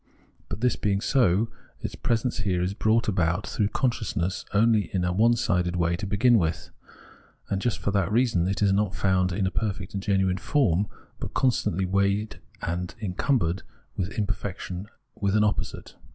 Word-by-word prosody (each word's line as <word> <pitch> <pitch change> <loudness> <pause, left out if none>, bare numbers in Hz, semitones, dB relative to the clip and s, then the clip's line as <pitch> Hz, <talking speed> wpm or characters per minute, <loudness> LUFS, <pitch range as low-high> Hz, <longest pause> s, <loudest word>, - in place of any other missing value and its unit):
But, - - -5
this 125 0 +2
being 100 -2 0
so, 110 -3 +2 0.3
its - - -5
presence 120 +1 -1
here 95 -4 0
is 90 +2 -1
brought 110 +2 +2
about 90 -1 +1
through 105 - 0
consciousness 105 -6 -1
only 110 0 +3
in 90 -2 0
a 90 - 0
onesided 100 -4 +2
way 85 -1 +1
to 100 +1 -4
begin 115 +4 +4
with, 80 -2 -2 0.8
and 95 -1 0
just 120 0 0
for 100 - -2
that 100 -2 +1
reason 110 -7 +2
is 95 +1 +2
not 100 -1 +1
found 95 -1 +2
in 95 +2 0
a 95 - 0
perfect 100 -1 -3
and 100 - -2
genuine 95 -2 +1
form, 105 - +2 0.3
but - - -6
constantly 105 -8 +1
weighted 100 +3 0 0.2
and 90 +4 -3
en 100 -5 -3
cumbered 95 - +1 0.3
with 95 +1 -3
imperfection, 100 -2 -3 0.3
with 100 -1 0
an 105 - +4
opposite. 105 - -2
100 Hz, 165 wpm, -26 LUFS, 90-110 Hz, 0.8 s, begin